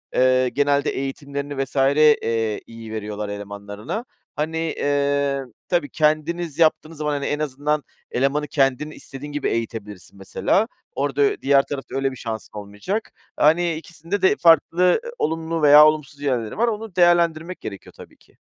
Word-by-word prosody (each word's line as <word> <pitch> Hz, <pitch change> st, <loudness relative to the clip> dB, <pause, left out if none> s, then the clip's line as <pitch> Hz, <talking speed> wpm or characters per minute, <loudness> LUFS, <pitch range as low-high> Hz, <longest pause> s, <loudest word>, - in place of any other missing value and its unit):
eee, 130 Hz, 0 st, +4 dB
genelde 145 Hz, 0 st, +1 dB
eğitimlerini 140 Hz, +1 st, -4 dB
vs. 135 Hz, -, -11 dB
eee, 135 Hz, -6 st, +3 dB
iyi 115 Hz, -1 st, -10 dB
veriyorlar 105 Hz, -1 st, -4 dB
elemanlarına. 100 Hz, -, -6 dB, 0.3 s
Hani, 155 Hz, +2 st, -2 dB
eee, 140 Hz, -3 st, 0 dB, 0.3 s
tabii 170 Hz, -6 st, 0 dB
kendiniz 155 Hz, +1 st, 0 dB
yaptığınız 160 Hz, 0 st, +2 dB
zaman, 150 Hz, 0 st, -1 dB
hani, 140 Hz, -1 st, -2 dB
en 145 Hz, -, -1 dB
azından 150 Hz, +1 st, -1 dB, 0.3 s
elemanı 140 Hz, +4 st, 0 dB
kendin, 135 Hz, +1 st, +1 dB
istediğin 145 Hz, 0 st, -9 dB
gibi 145 Hz, -1 st, -1 dB
eğitebilirsin 105 Hz, -4 st, -5 dB
mesela. 185 Hz, -, 0 dB, 0.3 s
Orada -, -, -1 dB
ö 415 Hz, -1 st, +2 dB
diğer 140 Hz, 0 st, +5 dB
tarafta 140 Hz, -2 st, -6 dB
öyle 135 Hz, 0 st, 0 dB
bir -, -, -8 dB
şansın 110 Hz, -3 st, -6 dB
olmayacak. 105 Hz, -, -4 dB, 0.3 s
Hani, 170 Hz, +3 st, +3 dB
ikisinde 165 Hz, +4 st, -5 dB
de 190 Hz, -, +4 dB
farklı, 165 Hz, 0 st, +4 dB
ııı, 180 Hz, -, +4 dB, 0.2 s
olumlu 160 Hz, +1 st, -1 dB
veya 150 Hz, 0 st, +9 dB
olumsuz 150 Hz, -2 st, -2 dB
yerleri 125 Hz, -6 st, -2 dB
var, 235 Hz, +2 st, +2 dB
onu 220 Hz, -3 st, -4 dB
değerlendirmek 175 Hz, -1 st, +2 dB
gerekiyor 100 Hz, -2 st, -8 dB
tabii -, -, -14 dB
ki. -, -, -28 dB
145 Hz, 150 wpm, -22 LUFS, 130-160 Hz, 0.3 s, veya